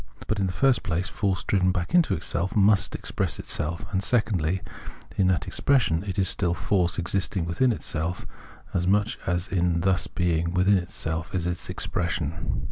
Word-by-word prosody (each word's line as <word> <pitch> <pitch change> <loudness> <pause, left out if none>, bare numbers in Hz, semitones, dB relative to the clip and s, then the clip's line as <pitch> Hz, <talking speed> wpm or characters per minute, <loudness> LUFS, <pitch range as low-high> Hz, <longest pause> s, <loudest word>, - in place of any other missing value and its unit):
But 110 - -1
in 95 - +1
the - - -2
first 135 +6 +3
place 90 +1 -1
force 100 -3 -1
driven 95 -2 +2
back 90 -1 -3
into 175 -3 +4
itself 95 +4 -2
must 100 -2 +4
express - - -2
itself; 80 +2 -2
and, 95 - 0
secondly, 95 -6 +1 0.5
in 95 - +3
that 90 -2 +1
expression 115 -12 +2
it 95 - -3
is 95 -1 +2
still 85 -1 0
force 90 -3 +1
existing 90 +1 -1
within 95 +10 +2
itself, 85 -5 -3 0.5
as 90 0 0
much 105 +5 +2
as 90 0 0
in 85 -2 +1
thus 95 0 +2
being 85 -1 0
within 95 +2 +4
itself 85 -1 -4
it 90 -2 -1
is 90 0 -3
expression. 85 -2 -2
90 Hz, 170 wpm, -26 LUFS, 85-100 Hz, 0.5 s, into